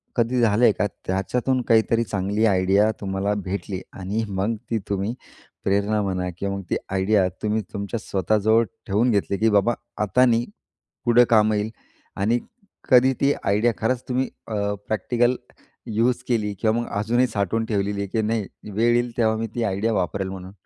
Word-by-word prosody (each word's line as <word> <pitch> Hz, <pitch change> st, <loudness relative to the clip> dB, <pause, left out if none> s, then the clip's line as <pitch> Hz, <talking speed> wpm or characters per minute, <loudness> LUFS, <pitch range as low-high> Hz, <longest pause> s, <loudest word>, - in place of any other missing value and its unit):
कधी 120 Hz, +1 st, +1 dB
झालंय 115 Hz, +1 st, +4 dB
का 105 Hz, -, 0 dB, 0.2 s
त्याच्यातून 125 Hz, +7 st, 0 dB
काहीतरी 115 Hz, 0 st, +4 dB
चांगली 105 Hz, +1 st, 0 dB
आयडिया 100 Hz, +1 st, +3 dB
तुम्हाला 95 Hz, +1 st, -1 dB
भेटली 100 Hz, +1 st, -4 dB
आहे 95 Hz, -, -12 dB
आणि 100 Hz, +5 st, -1 dB
मग 100 Hz, +4 st, -1 dB, 0.2 s
ती 115 Hz, -, +2 dB
तुम्ही 100 Hz, +3 st, -1 dB, 0.5 s
प्रेरणा 100 Hz, +2 st, +1 dB
म्हणा 90 Hz, -2 st, -2 dB
किंवा 100 Hz, +1 st, -2 dB
मग 100 Hz, -, -5 dB
ती -, -, +3 dB, 0.2 s
आयडिया 95 Hz, 0 st, +2 dB, 0.2 s
तुम्ही 110 Hz, +1 st, +1 dB
तुमच्या 100 Hz, +2 st, -3 dB
स्वतःजवळ 110 Hz, +4 st, +2 dB, 0.2 s
ठेवून 110 Hz, +5 st, +2 dB
घेतली 100 Hz, -1 st, 0 dB
की 110 Hz, +3 st, +3 dB
बाबा 105 Hz, +3 st, +3 dB, 0.3 s
आता 105 Hz, +5 st, +4 dB
नाही, 120 Hz, -1 st, +2 dB, 0.6 s
पुढं 120 Hz, 0 st, +6 dB
कामं 110 Hz, -1 st, +4 dB
येईल 105 Hz, +1 st, -1 dB, 0.5 s
आणि 110 Hz, +5 st, +2 dB, 0.5 s
कधी 130 Hz, 0 st, +6 dB
ती 140 Hz, +1 st, +4 dB
आयडिया 105 Hz, +4 st, +2 dB
खरंच 125 Hz, +2 st, 0 dB
तुम्ही 130 Hz, +1 st, 0 dB, 0.2 s
अ, 110 Hz, -, -4 dB, 0.3 s
प्रॅक्टिकल 120 Hz, +4 st, +1 dB, 0.5 s
युज 115 Hz, +3 st, +1 dB
केली 110 Hz, -4 st, 0 dB
किंवा 110 Hz, 0 st, +2 dB
मग 120 Hz, -, -5 dB
अजूनही 120 Hz, +5 st, +2 dB
साठवून 110 Hz, 0 st, -1 dB
ठेवलेली 100 Hz, -2 st, -1 dB
आहे 100 Hz, -, -2 dB
की 110 Hz, +3 st, -1 dB
नाही 110 Hz, -1 st, -1 dB, 0.3 s
वेळ 115 Hz, +4 st, +2 dB
येईल 120 Hz, -1 st, 0 dB
तेव्हा 110 Hz, -1 st, +3 dB
मी 115 Hz, +1 st, -2 dB
ती 120 Hz, -, -1 dB
आयडिया 100 Hz, +2 st, 0 dB
वापरेल 95 Hz, 0 st, -1 dB
म्हणून? 95 Hz, 0 st, -8 dB
110 Hz, 170 wpm, -23 LUFS, 100-115 Hz, 0.6 s, पुढं